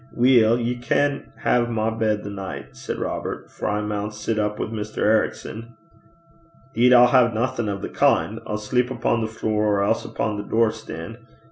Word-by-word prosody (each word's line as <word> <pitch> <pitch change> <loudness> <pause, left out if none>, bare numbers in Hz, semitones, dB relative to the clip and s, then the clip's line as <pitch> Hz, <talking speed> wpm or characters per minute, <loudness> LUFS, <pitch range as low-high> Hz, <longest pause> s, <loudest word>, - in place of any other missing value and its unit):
'Weel, 120 -2 +4
ye 120 +1 -1
can 140 +3 0
hae 120 - +3
my 115 -1 -1
bed 110 -2 0
the 100 - -6
nicht,' 95 -1 -7
said - - -5
Robert, - - -4
'for - - -5
I 105 0 0
maun 105 0 -3
sit 105 +1 -3
up 105 0 -1
wi' - - -2
Mr. 110 -1 -6
Ericson.' 110 +1 -1 1.0
''Deed 125 +1 +4
I'll 125 -1 +8
hae 125 -2 +5
naething 120 0 -1
o' 100 - -2
the 100 - -5
kin'. 110 +2 +1
I'll 105 - -2
sleep 125 +4 0
upo' 120 -2 0
the 110 - -1
flure, 105 -1 0
or 100 - +1
else 115 +3 +1
upo' 110 -2 -3
the 105 - -4
door 115 -1 +3
stane. 85 +4 -8
110 Hz, 190 wpm, -23 LUFS, 105-120 Hz, 1.0 s, I'll